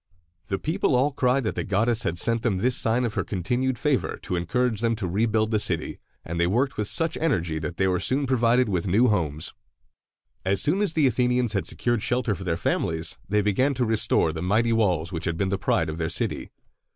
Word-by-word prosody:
The 95 Hz, -, -1 dB
people 160 Hz, -, 0 dB
all 135 Hz, +4 st, +2 dB
cried 130 Hz, 0 st, +1 dB
that 110 Hz, -, -1 dB
the -, -, -3 dB
goddess 110 Hz, +4 st, 0 dB
had 85 Hz, -, -2 dB
sent 115 Hz, +4 st, +1 dB
them 110 Hz, -6 st, 0 dB
this 125 Hz, +6 st, +1 dB
sign 120 Hz, +2 st, +2 dB
of 115 Hz, -, -3 dB
her -, -, -1 dB
continued 120 Hz, +7 st, -1 dB
favor 135 Hz, 0 st, 0 dB
to 90 Hz, -, -3 dB
encourage 115 Hz, +5 st, 0 dB
them 115 Hz, -1 st, +1 dB
to 105 Hz, -4 st, -3 dB
rebuild 110 Hz, +3 st, +1 dB
the 110 Hz, -, +2 dB
city, 85 Hz, -5 st, -2 dB, 0.3 s
and 85 Hz, +1 st, -4 dB
they 85 Hz, -, +3 dB
worked 125 Hz, +8 st, 0 dB
with 105 Hz, -1 st, -2 dB
such 165 Hz, +5 st, -1 dB
energy 85 Hz, -, 0 dB
that 80 Hz, +2 st, -5 dB
they 95 Hz, -, +2 dB
were 90 Hz, -1 st, +1 dB
soon 135 Hz, +7 st, +1 dB
provided 125 Hz, -1 st, +2 dB
with 95 Hz, -2 st, -1 dB
new 115 Hz, +7 st, +4 dB
homes. 80 Hz, -7 st, -1 dB, 0.9 s
As 95 Hz, +1 st, +1 dB
soon 180 Hz, +7 st, +1 dB
as 200 Hz, -6 st, 0 dB
the 155 Hz, -3 st, +3 dB
Athenians 125 Hz, -2 st, +1 dB
had 95 Hz, -, -1 dB
secured 120 Hz, -3 st, -1 dB
shelter 120 Hz, -1 st, 0 dB
for 95 Hz, 0 st, -7 dB
their 85 Hz, -3 st, -1 dB
families, 80 Hz, -1 st, -1 dB
they 105 Hz, 0 st, +2 dB
began 130 Hz, +8 st, +1 dB
to 125 Hz, 0 st, 0 dB
restore 110 Hz, -7 st, +2 dB
the 80 Hz, -, -5 dB
mighty 110 Hz, +6 st, +2 dB
walls 90 Hz, -7 st, +1 dB
which 85 Hz, -2 st, -4 dB
had 85 Hz, -1 st, -2 dB
been 95 Hz, +2 st, 0 dB
the 95 Hz, 0 st, -1 dB
pride 80 Hz, -, +1 dB
of 80 Hz, +1 st, -5 dB
their 80 Hz, -1 st, -1 dB
city. 85 Hz, -, -2 dB
110 Hz, 225 wpm, -25 LUFS, 90-125 Hz, 0.9 s, new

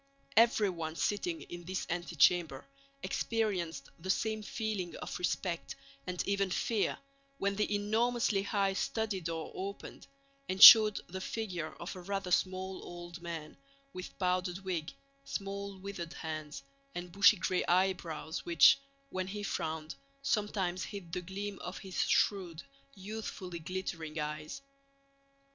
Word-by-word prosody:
Everyone 195 Hz, -8 st, +3 dB
sitting 325 Hz, -, -1 dB
in 175 Hz, 0 st, -9 dB
this 185 Hz, +1 st, -3 dB
antechamber 170 Hz, -3 st, +2 dB, 0.4 s
experienced 180 Hz, -11 st, -1 dB
the 185 Hz, +3 st, -7 dB
same 220 Hz, +2 st, 0 dB
feeling 210 Hz, -4 st, -3 dB
of -, -, -6 dB
respect 180 Hz, -1 st, -2 dB, 0.3 s
and 180 Hz, -1 st, -2 dB
even 200 Hz, -1 st, +1 dB
fear 210 Hz, +3 st, 0 dB, 0.4 s
when 200 Hz, 0 st, 0 dB
the 210 Hz, 0 st, +1 dB
enormously 220 Hz, 0 st, +1 dB
high 200 Hz, -1 st, +1 dB
study 210 Hz, -1 st, -1 dB
door 165 Hz, -1 st, -4 dB
opened 200 Hz, +1 st, -7 dB, 0.4 s
and 190 Hz, +1 st, -2 dB
showed 215 Hz, -1 st, +11 dB
the 185 Hz, +2 st, -6 dB
figure 185 Hz, -8 st, -4 dB
of 175 Hz, +3 st, -6 dB
a 185 Hz, -, -8 dB
rather 195 Hz, 0 st, -3 dB
small 185 Hz, +1 st, 0 dB
old 175 Hz, 0 st, -9 dB
man, 165 Hz, -3 st, -6 dB, 0.4 s
with 185 Hz, 0 st, -8 dB
powdered 180 Hz, -1 st, 0 dB
wig, 170 Hz, -4 st, -2 dB, 0.3 s
small 200 Hz, -4 st, -5 dB
withered 185 Hz, -3 st, -6 dB
hands, 155 Hz, -4 st, -6 dB, 0.3 s
and 175 Hz, 0 st, -5 dB
bushy 200 Hz, +3 st, +6 dB
gray 180 Hz, +1 st, 0 dB
eyebrows 175 Hz, -3 st, 0 dB
which, 170 Hz, +9 st, +6 dB, 0.3 s
when 185 Hz, 0 st, -2 dB
he 205 Hz, +2 st, -5 dB
frowned, 160 Hz, -4 st, -3 dB, 0.3 s
sometimes 195 Hz, -6 st, 0 dB
hid 180 Hz, -5 st, -8 dB
the 180 Hz, -, -1 dB
gleam 195 Hz, +3 st, -5 dB
of 180 Hz, +2 st, -6 dB
his 190 Hz, -2 st, -3 dB
shrewd, 180 Hz, -5 st, +1 dB, 0.3 s
youthfully 190 Hz, -3 st, -6 dB
glittering 165 Hz, -2 st, -5 dB
eyes. 150 Hz, -, -4 dB
185 Hz, 130 wpm, -32 LUFS, 170-200 Hz, 0.4 s, showed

